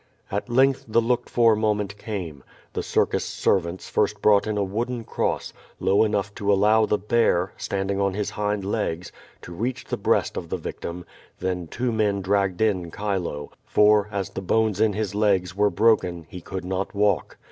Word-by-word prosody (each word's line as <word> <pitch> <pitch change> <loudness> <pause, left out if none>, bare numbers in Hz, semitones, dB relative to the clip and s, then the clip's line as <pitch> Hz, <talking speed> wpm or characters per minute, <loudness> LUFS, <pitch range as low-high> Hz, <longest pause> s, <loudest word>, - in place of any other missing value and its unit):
At 100 +5 -3
length 135 +2 +3
the 110 +1 +3
looked 120 +1 0
for 115 -2 +4
moment 105 -2 0
came. 90 -10 -6 0.3
The - - -2
circus - - +1
ser 95 - +2
vants 85 +1 -7
first - - 0
brought 105 0 +4
in 105 -1 -1
a 100 - +1
wooden 115 +5 -3
cross, - - -2 0.3
low 95 +3 +3
enough 105 -1 -1
to 100 0 +1
allow 105 +2 +4
the 105 - +2
bear, 100 -4 +1
standing 100 0 -2
on 100 -1 0
his 105 0 -2
hind 105 -1 -2
legs, 95 -5 -2 0.3
to 85 - -9
reach 120 +8 -3
the - - -3
breast - - +1
of - - -5
the - - -2
vic - - -7
tim; 85 +1 -6 0.3
then 90 -2 -3
two 125 +8 -2
men 105 -3 +1
dragged 100 -1 +1
in 95 -6 +1
Chilo, 90 -7 -3
for, 105 0 +4
as 100 -3 -3
the - - -5
bones 110 +1 +1
in 110 -2 +3
his 105 -1 -2
legs 95 -4 +1
were 105 +1 +3
broken, 95 -7 +2
he 90 - -8
could 95 +2 -6
not 95 +2 -3
walk. 100 -4 +1
100 Hz, 190 wpm, -24 LUFS, 95-110 Hz, 0.3 s, for